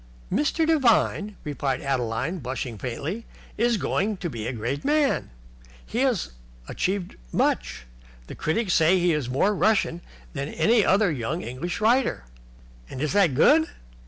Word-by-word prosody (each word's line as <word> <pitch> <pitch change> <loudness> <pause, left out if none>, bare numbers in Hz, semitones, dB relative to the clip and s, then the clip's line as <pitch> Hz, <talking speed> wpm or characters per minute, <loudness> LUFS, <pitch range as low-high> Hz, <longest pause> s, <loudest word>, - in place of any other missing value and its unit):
"Mr. 300 +3 +1
Devine," 235 -8 +2
replied 140 -3 -2
Adeline, 130 +5 -2
blushing 125 -2 -4
faintly, 150 - -4 0.3
"is 235 0 +2
going 205 +1 -1
to 175 -3 -4
be 115 -2 -5
a - - -1
great 125 +5 -3
man. 295 -1 +1
Already - - -24
he 235 - -3
has 255 - +1 0.4
achieved 190 -1 -2
much. - - 0 0.4
The - - -9
critics 180 +4 -1
say 165 +3 +4
that 185 - +1
he 175 -1 +3
is 145 -5 -2
more 145 +11 +2
Russian 200 -4 +1 0.3
than 140 -2 -3
any 225 -1 +3
other 195 -1 +3
young 145 +5 -3
English 140 +9 -4
writer." 230 - +2 0.7
"And 130 - -7
is 155 +3 -1
that 190 -9 +3
good?" 315 - +5
170 Hz, 155 wpm, -25 LUFS, 130-215 Hz, 0.7 s, good